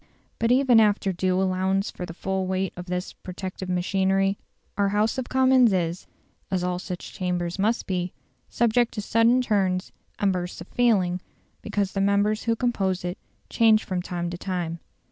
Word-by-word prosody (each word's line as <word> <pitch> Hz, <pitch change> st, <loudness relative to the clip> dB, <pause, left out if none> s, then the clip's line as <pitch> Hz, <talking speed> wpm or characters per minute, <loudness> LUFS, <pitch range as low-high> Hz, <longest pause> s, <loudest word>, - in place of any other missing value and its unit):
But 230 Hz, +1 st, +2 dB
even 255 Hz, -2 st, +5 dB
after 205 Hz, -3 st, +2 dB
due 185 Hz, +1 st, 0 dB
allowance 190 Hz, +1 st, 0 dB
for 180 Hz, -, -6 dB
the 165 Hz, -, -7 dB
full 190 Hz, 0 st, -2 dB
weight 190 Hz, 0 st, -1 dB
of 180 Hz, +1 st, -8 dB
this 180 Hz, +1 st, -3 dB
protective 185 Hz, 0 st, -7 dB
machinery, 195 Hz, +2 st, +1 dB, 0.4 s
our 200 Hz, -1 st, +2 dB
House 215 Hz, +5 st, +1 dB
of 255 Hz, -, -5 dB
Commons 260 Hz, -4 st, +5 dB
is, 175 Hz, -1 st, -1 dB, 0.4 s
as 185 Hz, -2 st, -1 dB
all 180 Hz, 0 st, -1 dB
such 180 Hz, -1 st, -7 dB
chambers 180 Hz, -1 st, -2 dB
must 220 Hz, +4 st, +1 dB
be, 180 Hz, -1 st, -2 dB, 0.4 s
subject 240 Hz, +1 st, +2 dB
to 210 Hz, -, -2 dB
sudden 230 Hz, +4 st, +3 dB
turns 190 Hz, -5 st, 0 dB, 0.3 s
and 200 Hz, -2 st, +2 dB
bursts 180 Hz, 0 st, -4 dB
of -, -, -10 dB
feeling, 190 Hz, -7 st, +2 dB, 0.4 s
because 200 Hz, -2 st, -1 dB
the 195 Hz, -, -1 dB
members 205 Hz, +2 st, +2 dB
who 230 Hz, -1 st, +2 dB
compose 195 Hz, -7 st, -1 dB
it 175 Hz, +1 st, -4 dB, 0.3 s
change 220 Hz, -1 st, +4 dB
from 185 Hz, -1 st, -2 dB
time 175 Hz, -1 st, -4 dB
to 175 Hz, -, -6 dB
time. 175 Hz, -3 st, -3 dB
190 Hz, 170 wpm, -25 LUFS, 180-215 Hz, 0.4 s, even